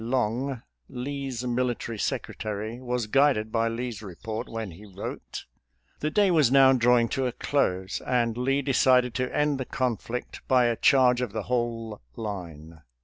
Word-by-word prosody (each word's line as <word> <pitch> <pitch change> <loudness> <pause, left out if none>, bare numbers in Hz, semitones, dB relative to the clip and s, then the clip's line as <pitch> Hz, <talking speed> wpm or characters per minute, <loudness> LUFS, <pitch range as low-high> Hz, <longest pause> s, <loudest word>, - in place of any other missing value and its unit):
Long, 125 +1 -1 0.3
Lee's 130 -1 -4
military 120 -2 -2
sec - - -1
retary, 110 +2 -5
was 125 -2 -2
guided 110 -2 +2
by 115 0 +1
Lee's 115 -1 -4
report 110 +4 -6
when 110 -4 -5
he 90 +6 -13
wrote: 100 -1 -7 0.3
" - - -41
The 150 - -1
day 200 +2 +3
was 150 -8 +4
now 135 -1 +7
drawing 120 -1 +4
to 135 -2 0
a - - -1
close, 95 -9 -1
and 120 -2 +1
Lee 135 +3 0
decided 130 -2 +3
to 125 +1 -2
end 150 -2 +1
the 130 - -2
conflict 125 -1 -3
by 125 -2 +4
a 120 -1 +2
charge 125 0 +4
of 120 -5 -3
the 110 - -3
whole 115 -2 -2
line. 85 -7 -7
120 Hz, 165 wpm, -27 LUFS, 110-130 Hz, 0.3 s, now